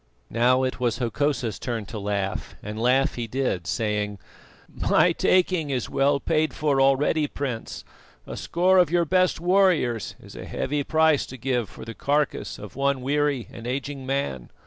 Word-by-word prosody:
Now 125 +3 +3
it 130 0 -2
was 120 -3 0
Hokosa's 125 -2 -1
turn 115 -4 -3
to 105 +2 -7
laugh, 100 -1 -3
and 105 +2 -5
laugh 130 +3 +3
he 120 -1 -4
did, 110 -9 -2
saying: 105 -2 -1 0.5
"My - - +2
taking 180 -4 +2
is 130 -3 -2
well 140 +1 +2
paid 155 +1 0
for 145 -3 +1
already, 145 +3 +3
Prince. 130 -6 -5 0.4
A - - -7
score 185 +2 +2
of 180 - +4
your 170 0 +2
best 185 +2 +2
warriors 170 - +2
is - - -13
a - - -7
heavy 145 +1 -2
price 160 -1 +3
to 130 - -9
give 125 -3 -1
for - - -11
the 115 - -7
carcase 145 +3 -1
of 105 -3 -10
one 140 0 0
weary 145 -2 0
and 115 +1 -8
aging 135 +1 -4
man. 135 - -2
135 Hz, 170 wpm, -25 LUFS, 115-150 Hz, 0.5 s, of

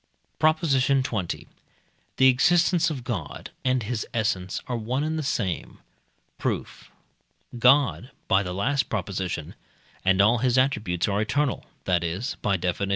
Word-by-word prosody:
PROP. 155 0 +4
XX. 130 - 0 0.7
The 130 +1 +6
existence 170 +6 +4
of 135 -6 -5
God 100 - -5
and 130 -2 +1
his 110 0 -2
essence 95 -4 -1
are 125 - -3
one 120 +5 -2
and 155 +1 -1
the 160 - -1
same. 115 - -2 0.6
Proof. - - -4 0.7
God 130 0 +4 0.2
(by 95 0 +4
the 90 -2 -4
last 135 +10 0
Prop.) 100 -3 -3 0.9
and 95 0 +3
all 110 +4 +5
his 125 +1 +2
attributes 105 -10 +1
are 100 0 0
eternal, 135 +6 -1 0.2
that 90 -2 +1
is 90 +9 -3
(by 100 -2 +1
Def. 90 0 -1
viii.) 100 - -1
120 Hz, 145 wpm, -25 LUFS, 100-135 Hz, 0.9 s, The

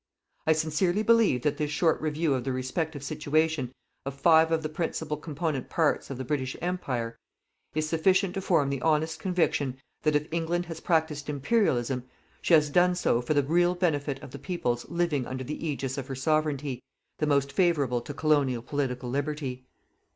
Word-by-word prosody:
I 160 - +6
sincerely 160 +6 +1
believe 225 - +4
that 150 - +1
this 150 -1 -1
short 160 +2 +2
review 155 0 0
of 130 -2 -1
the 135 - -2
respective 140 +3 -3
situation 150 -2 0 0.3
of 140 0 -5
five 160 +1 +5
of 160 -1 +1
the - - 0
principal 155 -1 -3
component 150 -2 -3
parts 160 -3 +1
of 135 - -5
the 130 - -5
British 130 -1 -2
Empire, 125 -10 -3 0.6
is 155 0 0
sufficient 185 +4 +2
to 195 - -3
form 160 -7 +2
the 135 -2 -2
honest 160 +1 +1
conviction 160 -8 0 0.2
that 155 -1 +2
if 150 +1 +1
England 170 +1 0
has 165 -1 -7
practised 160 -4 0
Imperialism, 135 - +1 0.4
she 170 - +5
has 150 -2 +3
done 180 +2 +4
so 120 -8 +1
for 135 +5 -1
the 145 - +4
real 175 +5 +2
benefit 145 -6 0
of - - -9
the 140 - -8
peoples 125 -7 -2
living 170 -7 0
under 130 0 -4
the 150 +4 -5
ægis 140 -4 -3
of 135 - -6
her 135 - -4
Sovereignty, 145 -2 0 0.4
the 150 - +1
most 140 -1 +2
favourable 145 -10 +2
to 130 - -7
colonial 145 -5 +1
political 130 -2 -2
liberty. 135 -1 -3
150 Hz, 180 wpm, -28 LUFS, 135-165 Hz, 0.6 s, I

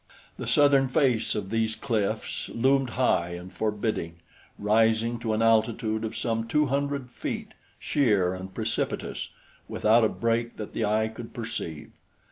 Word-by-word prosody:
The - - -5
southern 140 -2 +5
face 125 -3 +2
of 100 -2 -4
these 110 -1 0
cliffs 110 -4 -2
loomed 135 +2 +2
high 85 -9 +2
and 90 +2 -9
forbidding, 105 -4 -2 0.4
rising 110 +2 +2
to 115 -1 -2
an 110 - +1
altitude 110 0 +2
of 110 - -4
some 115 -1 -1
two 150 +6 +2
hundred 140 -1 -2
feet, - - -5 0.3
sheer 105 -10 +2
and 95 +1 -7
precipitous, - - -3 0.4
without 110 +2 +3
a 110 - +4
break 115 0 -1
that 105 - -6
the 110 - 0
eye 110 +1 +2
could 115 +1 -9
perceive. 100 -10 -5
115 Hz, 145 wpm, -27 LUFS, 105-120 Hz, 0.4 s, southern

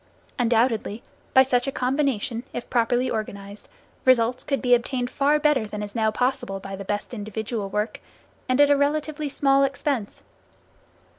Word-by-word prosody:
Undoubtedly, 230 -2 +1 0.3
by 265 - +9
such 250 -1 +1
a - - 0
combination 255 -4 -1
if 240 - -5
properly 245 +1 +2
organized, 205 -3 -5 0.3
results 250 -1 +3
could 275 -2 -1
be 245 +2 +2
obtained 245 +1 0
far 285 +3 +2
better 295 -7 +2
than 210 0 -5
is 205 - -7
now 220 -2 +2
possible 245 -3 -1
by 195 0 -7
the 195 - -7
best 205 +4 -4
individual 215 -1 -4
work, 210 +2 -2 0.5
and 255 +1 +2
at 290 0 +6
a - - +6
relatively 300 +1 -1
small 275 0 +3
expense. 275 -5 -2
245 Hz, 155 wpm, -24 LUFS, 215-275 Hz, 0.5 s, by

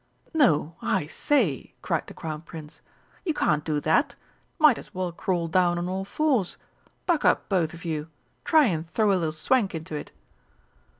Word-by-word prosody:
"No, 170 - +3
I - - 0
say," 185 - 0
cried - - -1
the - - -11
Crown 155 -2 -5
Prince, 160 -2 -11 0.4
"you 325 -5 -1
can't 150 - +1
do 150 -2 0
that 160 - +2 0.4
might 305 -7 +5
as - - -13
well 185 -1 -2
crawl 175 -1 -1
down 175 +1 +2
on 175 +1 -2
all 190 +1 -3
fours! 255 - 0 0.5
Buck 340 -4 +1
up, - - +3
both 170 -5 +1
of 170 - -12
you. 155 -1 -3 0.3
Try 315 -3 +5
and 165 -6 -1
throw 210 +3 +2
a - - +4
little 165 -4 0
swank 195 +5 +1
into 160 0 -6
it!" 150 - -5
175 Hz, 175 wpm, -26 LUFS, 160-220 Hz, 0.5 s, might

